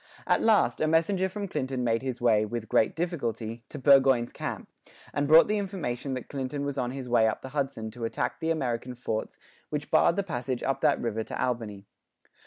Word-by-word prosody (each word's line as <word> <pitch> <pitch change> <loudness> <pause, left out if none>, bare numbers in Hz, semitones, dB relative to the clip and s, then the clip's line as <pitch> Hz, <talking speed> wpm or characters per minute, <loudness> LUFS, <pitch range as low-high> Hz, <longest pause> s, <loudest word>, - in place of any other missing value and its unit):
At - - +2
last, 220 -2 +3
a 155 - +3
messenger 180 +4 +2
from 200 +1 -5
Clinton 130 -6 -2
made 115 -1 +1
his 130 -2 -4
way, 115 -4 +3
with 110 +1 -4
great 110 - +2
difficulty, 120 -9 -3
to - - -7
Burgoyne's 135 -3 +4
camp, - - -5 0.5
and 145 0 0
brought 160 +2 +8
the 210 0 +1
information 145 -10 -3
that 130 - -6
Clinton 140 +1 -4
was 140 -1 -3
on 125 -3 -1
his 130 0 -6
way 120 -2 +4
up 110 - -2
the 130 - -6
Hudson 135 -6 -3
to 115 0 -5
attack 115 - -2
the 165 -1 -2
American 125 -5 -2
forts 110 -3 -4 0.3
which 150 -1 -4
barred 160 +1 +4
the 200 - 0
passage 125 -7 -3
up 135 - -1
that - - +3
river 115 -2 -2
to - - -6
Albany. 110 -5 -2
130 Hz, 200 wpm, -28 LUFS, 120-155 Hz, 0.5 s, brought